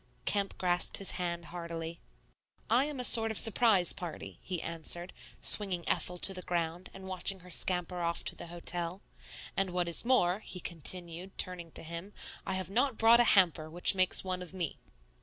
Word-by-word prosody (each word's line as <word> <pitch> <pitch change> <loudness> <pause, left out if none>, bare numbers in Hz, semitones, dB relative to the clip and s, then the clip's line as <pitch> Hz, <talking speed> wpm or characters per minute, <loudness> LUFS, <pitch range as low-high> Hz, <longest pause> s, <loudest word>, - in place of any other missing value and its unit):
Kemp 200 -1 -2
grasped 180 -1 0
his 195 - 0
hand 170 -1 -5
heartily. 170 -1 -7 0.7
"I 250 +4 +3
am 295 -3 -6
a - - -3
sort 225 -2 +8
of 220 - -3
surprise 220 -5 +5
party," 130 - -9
he 180 -3 -5
answered, 170 +2 -1 0.3
swinging 185 -5 +5
Ethel 180 - 0
to 195 - +2
the 185 - -7
ground 170 0 -4
and 190 0 -11
watching 185 +1 -2
her 180 0 -13
scamper 180 +1 -1
off 170 0 -3
to - - 0
the - - -10
hotel; 175 +2 -5 0.5
"and 195 -1 -1
what 180 -1 -2
is 170 - +4
more," 205 -7 +1
he 190 -3 -7
continued, 175 +2 -3
turning 175 -3 -4
to - - -4
him, 170 +5 -9 0.3
"I 190 - -2
have 185 0 -5
not 250 +2 0
brought 230 +1 +5
a - - +5
hamper, 165 -4 +2
which 175 +5 +2
makes 185 -1 +3
one 185 -1 -4
of 180 +1 -9
me." 175 -5 -3
180 Hz, 185 wpm, -30 LUFS, 170-195 Hz, 0.7 s, sort